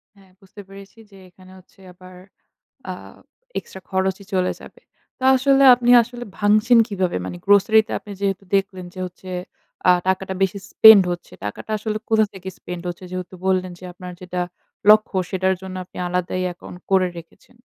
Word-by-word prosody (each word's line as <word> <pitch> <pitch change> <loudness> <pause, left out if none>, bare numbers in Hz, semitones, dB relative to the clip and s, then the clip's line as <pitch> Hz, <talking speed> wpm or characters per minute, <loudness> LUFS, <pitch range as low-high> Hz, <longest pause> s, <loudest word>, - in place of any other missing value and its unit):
হ্যাঁ, 195 -2 -22
বুঝতে 195 +1 -13
পেরেছি 195 +2 -14
যে, 195 - -16
এখানে 185 +1 -18
হচ্ছে 185 - -25
আবার 185 0 -15 0.8
আ - - -2 0.7
এক্সট্রা 190 - -10
খরচই 190 +1 -1
চলে 185 -1 +1
যাবে। 485 - -14 0.4
তো - - -16
আসলে 270 +1 +3
আপনি 245 0 0
আসলে 245 +1 -8
ভাঙছেন 215 +3 +4
কিভাবে? 190 - -1
মানে 90 -1 -6
grocery 205 +2 +5
তে - - -8
আপনি 205 - -11
যেহেতু 195 -1 -2
দেখলেন 190 -2 -3
যে, - - -12
হচ্ছে 180 +1 -12 0.6
আ - - +9 0.2
টাকাটা 190 0 -1
বেশি 195 +1 0
spend 220 -3 +9
হচ্ছে। 175 - -9
টাকাটা 105 - -6
আসলে 215 0 -3
কোথা 220 -1 +4
থেকে 190 0 -8
spend 180 -1 -7
হচ্ছে? 175 +1 -7
যেহেতু 185 0 -6
বললেন 185 -1 +1
যে, 185 - -13
আপনার 180 0 -9
যেটা 180 0 -5 0.5
লক্ষ্য, 215 -2 +4
সেটার 190 0 +1
জন্য 190 -1 -7
আপনি - - -20
আলাদাই 180 +1 -2
অ্যাকাউন্ট 180 0 -10
করে 190 -1 +4
রেখেছেন। 170 +8 -16
190 Hz, 170 wpm, -21 LUFS, 185-205 Hz, 0.8 s, আ